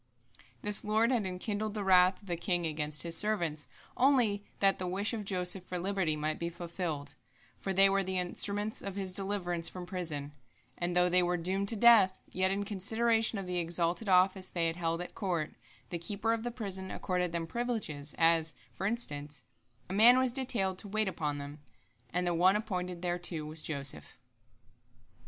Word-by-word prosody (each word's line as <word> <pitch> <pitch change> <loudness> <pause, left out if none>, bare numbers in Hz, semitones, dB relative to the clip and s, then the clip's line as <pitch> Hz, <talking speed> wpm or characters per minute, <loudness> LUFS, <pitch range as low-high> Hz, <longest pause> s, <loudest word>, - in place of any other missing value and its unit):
The 210 0 +2
Lord 220 +3 +2
had 225 -6 +1
enkindled 205 +3 -3
the 210 - -2
wrath 185 0 +5
of - - -16
the 175 - -1
king 175 0 -1
against 150 -1 -1
his 170 -1 -1
servants 170 -8 0 0.3
only 245 -6 +3 0.2
that 195 -1 +3
the 185 - -3
wish 200 +5 -1
of 220 -2 -3
Joseph 185 -1 0
for 180 0 -5
liberty 185 -3 0
might 155 +1 -2
be 170 - -2
fulfilled, 165 -4 -5 0.5
for 195 - -3
they 195 +1 +7
were 195 0 +2
the 190 0 -1
instruments 205 +4 0
of 195 -1 -5
his 190 -2 -3
deliverance 180 -3 -1
from 180 -1 -8
prison, 160 -6 -4 0.4
and 175 0 -3
though 180 0 +4
they 180 +1 +4
were 175 0 0
doomed 190 +4 -1
to 230 - +1
death, 215 -4 +6
yet 185 +1 +1
in 200 +1 -1
consideration 225 +3 +1
of 195 - -4
the 180 -1 -1
exalted 170 +4 -1
office 185 +1 +3
they 170 -2 0
had 165 0 0
held 165 0 -1
at 180 - -7
court, 175 -7 -2 0.4
the 170 - -3
keeper 205 +6 -1
of 230 - -2
the 240 - -3
prison 195 -5 -4
accorded 180 -2 -2
them 170 -1 -2
privileges, 170 -9 -3
as, 165 -1 +3 0.2
for 195 - -2
instance, 145 - -4 0.4
a 185 - -6
man 235 +5 +8
was 260 -1 +2
detailed 215 -8 0
to 210 - -6
wait 215 +1 0
upon 150 -6 -2
them, 145 +1 -8 0.5
and 180 +1 -1
the 175 - +1
one 185 +4 +4
appointed 180 -5 -3
thereto 175 -3 -1
was 155 +1 -3
Joseph. 140 - -2
185 Hz, 185 wpm, -31 LUFS, 170-205 Hz, 0.5 s, man